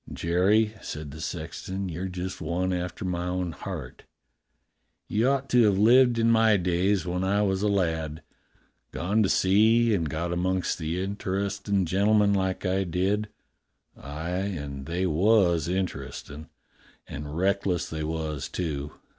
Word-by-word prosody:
"Jerry," 100 +6 +2
said 75 -2 -6
the 80 +2 -9
sexton, 95 +4 -5
"you're 90 +2 -4
just 90 0 -5
one 90 +4 -1
after 90 +2 -4
my 90 -1 -2
own 90 -1 -2
heart. 75 - -7 1.1
You 110 +4 +1
ought 135 0 0
to 125 - +5
have 100 -2 +3
lived 120 +3 +5
in 115 0 +3
my 110 -2 +5
days, 90 +2 +1
when 90 +1 -2
I 100 +2 +2
was 95 -1 0
a 105 - +2
lad. 80 -5 -1 0.7
Gone 100 +6 0
to 100 - +2
sea 110 +4 +4
and 85 -6 0
got 85 +4 -2
amongst 90 +1 -1
the 80 +2 -2
inter 100 0 -2
estin' 100 -1 -1
gentlemen 100 +3 +3
like 95 0 -1
I 95 +1 +1
did. 95 +4 -1 0.7
Aye, 85 +2 -4 0.2
they 90 +5 -1
was 90 -2 +3
interestin'. 90 -4 -4 0.6
And 75 +2 -7
reckless 95 -1 0
they 80 -1 -4
was, 75 -3 -3
too. 75 -5 -4
95 Hz, 145 wpm, -26 LUFS, 85-100 Hz, 1.1 s, to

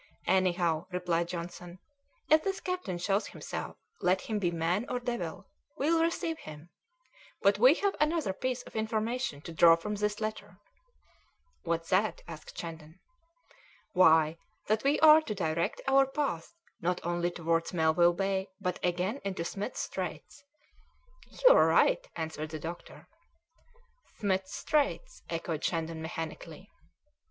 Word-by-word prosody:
"Anyhow," 175 -3 +1
replied 175 -2 0
Johnson, 175 0 -7 0.5
"if 310 0 +5
this 390 0 -2
captain 365 - -3
shows 195 +4 0
himself, - - -6 0.2
let 185 +1 +2
him 215 -2 -2
be 180 -4 +1
man 170 +5 0
or 250 - -1
devil, 240 -10 -4 0.3
we'll 325 +4 +2
receive 330 -1 -1
him; 155 +2 -11 0.7
but - - +4
we - - +7
have 400 -1 0
another 300 - +1
piece 255 +4 -3
of - - -14
information 220 - -2
to 165 - -8
draw 165 0 +7
from 190 +6 -5
this 210 0 -1
letter." 215 -3 -5 1.0
"What's 165 -1 -2
that?" 200 +3 +1
asked 160 -2 -10
Shandon. 160 0 -8 0.9
"Why, 160 -3 +5 0.3
that 215 +1 +1
we 280 +2 +2
are 315 0 +9
to 220 -9 -5
direct 165 -3 -1
our 270 0 +5
path 270 - -2 0.3
not 180 +1 0
only 175 0 0
towards 165 -1 -1
Melville 170 0 +3
Bay, 195 +1 -1
but 180 -1 -3
again 180 +8 -1
into 190 -4 -3
Smith's 205 +7 -4
Straits." 285 - -6 0.9
"You - - +6
are - - +5
right," - - +3
answered 160 -1 -4
the 155 - -5
doctor. 165 +3 -8 1.1
"Smith's 190 -3 -1
Straits?" 310 - -1
echoed 165 -2 -3
Shandon 165 -1 -2
mechanically. 160 0 -7
185 Hz, 135 wpm, -30 LUFS, 165-240 Hz, 1.1 s, are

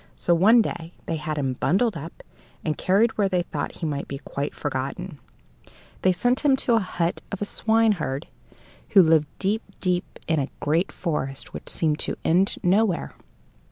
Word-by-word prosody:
So 175 - +2
one 220 +7 +6
day 170 -4 -5
they 165 - -2
had 155 0 -4
him 135 -3 0
bundled 200 - +1
up 165 +2 -8 0.4
and 155 -2 0
carried 215 +5 +2
where 200 -2 +3
they 180 -2 +1
thought 150 -3 -4
he 170 - -5
might 145 -2 -3
be 140 - -5
quite 140 +1 -5
forgotten. 145 +4 -4 0.8
They 185 - +4
sent 245 +8 +1
him 285 -3 +4
to 260 - 0
the 230 - +5
hut 175 -3 -2
of 200 - -4
a 205 - -1
swineherd 205 -11 +1 0.7
who 190 - +10
lived 160 -2 +4
deep, 205 +3 0 0.2
deep 180 -1 -1
in 160 -2 +2
a 135 - -2
great 160 +5 +1
forest 135 -6 -4
which - - -7
seemed 155 -2 0
to - - -2
end 185 +4 +3
nowhere. 190 0 +2
175 Hz, 175 wpm, -24 LUFS, 150-200 Hz, 0.8 s, who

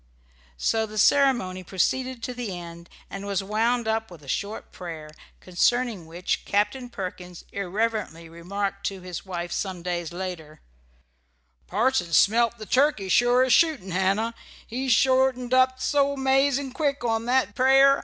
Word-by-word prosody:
So 220 - 0
the 215 0 -9
ceremony 240 -8 +3
proceeded 255 +7 -1
to 250 - -3
the 235 -7 -5
end, 170 0 -10 0.2
and 195 +1 -7
was 200 -1 -1
wound 225 +4 0
up 220 0 -1
with 170 -5 -13
a - - -15
short 200 +10 -4
prayer, 160 -4 -8 0.3
concerning 205 +1 0
which 175 +3 -3
Captain 210 +5 -1
Perkins 180 -4 -7
irreverently 200 -3 -2
remarked 195 +4 -4
to 195 -2 -5
his 180 +1 -7
wife 175 -2 -4
some 185 -3 -3
days 175 -2 -3
after: 170 -4 -6 1.1
"Parson 205 -5 0
smelt 230 +6 +4
the 215 - -8
turkey, 255 -6 +2
sure 245 +4 +4
as 260 -2 +3
shootin', 300 - +2
Hannah. 195 +5 +1 0.3
He 260 +3 -3
shortened 255 0 +3
up 260 0 +4
so 280 0 +1
'mazin' 270 0 +2
quick 280 -1 -1
on 225 -1 0
that 255 +2 +1
prayer. 270 +1 +5
215 Hz, 145 wpm, -25 LUFS, 180-255 Hz, 1.1 s, prayer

